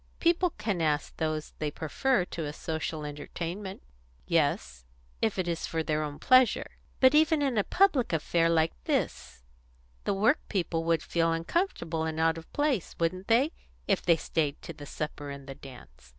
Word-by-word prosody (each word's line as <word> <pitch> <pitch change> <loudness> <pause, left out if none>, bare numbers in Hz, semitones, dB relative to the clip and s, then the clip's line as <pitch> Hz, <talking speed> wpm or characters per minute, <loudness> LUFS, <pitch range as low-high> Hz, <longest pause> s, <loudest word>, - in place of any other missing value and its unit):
People 350 +1 +3
can 210 -5 -1
ask 150 -2 0
those 155 -1 -2
they 150 - -1
prefer 180 - 0
to 165 -3 -5
a 145 - -4
social 160 -1 -4
entertainment." 170 +6 -6 0.4
"Yes 70 - 0 0.4
if 220 -3 +1
it 185 -2 -1
is 170 -1 -2
for 160 -1 -1
their 155 0 0
own 145 -1 -4
pleasure." 255 -1 +4 0.3
"But 260 +1 +6
even 310 0 +4
in 270 -3 +1
a 205 - +3
public 350 - +3
affair 165 +1 +2
like 165 -1 +2
this 60 -2 -2 0.6
the 200 - +1
work 220 +10 +3
people 170 -4 -1
would 165 -2 +2
feel 165 -1 +1
uncomfortable 165 - -1
and 160 0 -3
out 165 0 +2
of 160 - -16
place, 290 - 0
wouldn't 185 +3 -1
they, 250 +7 +4 0.4
if 195 - +2
they 170 -2 +4
stayed 150 -3 -1
to 165 - -7
the 145 -1 -10
supper 150 -1 -5
and 140 -1 -8
the 135 - -7
dance? 125 - -14
165 Hz, 175 wpm, -29 LUFS, 150-210 Hz, 0.6 s, But